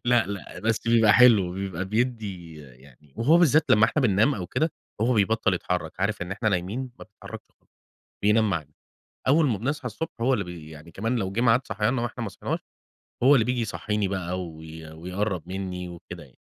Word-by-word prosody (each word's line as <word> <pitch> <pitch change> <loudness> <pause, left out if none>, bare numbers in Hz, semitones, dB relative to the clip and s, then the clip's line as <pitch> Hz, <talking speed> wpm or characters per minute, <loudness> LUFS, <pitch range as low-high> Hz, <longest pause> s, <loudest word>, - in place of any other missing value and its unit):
لأ، 120 -1 +3
لأ 100 -1 -7
بس 115 +1 -1
بيبقى 115 -3 +5
حلو، 110 -7 +6
بيبقى 95 -1 -4
بيدّي 105 -6 -2
يعني 65 +1 -18
وهو 155 +9 +4
بالذات 155 -2 +5
لمّا 110 +1 +6
إحنا 135 +5 +1
بننام 110 +5 +3
أو 90 -4 -5
كده، 160 - -1 0.3
هو 120 +3 +3
بيبطل 105 -1 +2
يتحرك، 90 -2 -2
عارف 100 0 0
إن 90 +2 -4
إحنا 110 +3 -1
نايمين 95 +4 -1
مبيتحرّكش 125 -2 -10 0.2
خالص - - -39 0.5
بينام 105 +1 +3
معانا، 75 -5 -3 0.6
أول 155 +2 +5
ما 110 -6 0
بنصحى 140 +3 -3
الصبح 160 +9 -4
هو 125 +3 +2
اللي 100 - -1
بي 85 -3 -9
يعني 80 +2 -12
كمان 115 +8 -2
لو 95 -4 -2
جِه 110 - -1
معاد 125 +2 +3
صحياننا 120 +3 0
وإحنا 120 0 -4
ما - - -3
صحيناش، - - -4 0.6
هو 135 +3 +7
اللي 115 - +4
بييجي 125 +1 -1
يصحّيني 105 -2 -2
بقى 90 -1 -3
و 85 -3 -8 0.4
ويقرَّب 90 +1 -3
مني 90 -1 -5
وكده 85 -1 -10
يعني. - - -16
105 Hz, 190 wpm, -25 LUFS, 90-120 Hz, 0.6 s, هو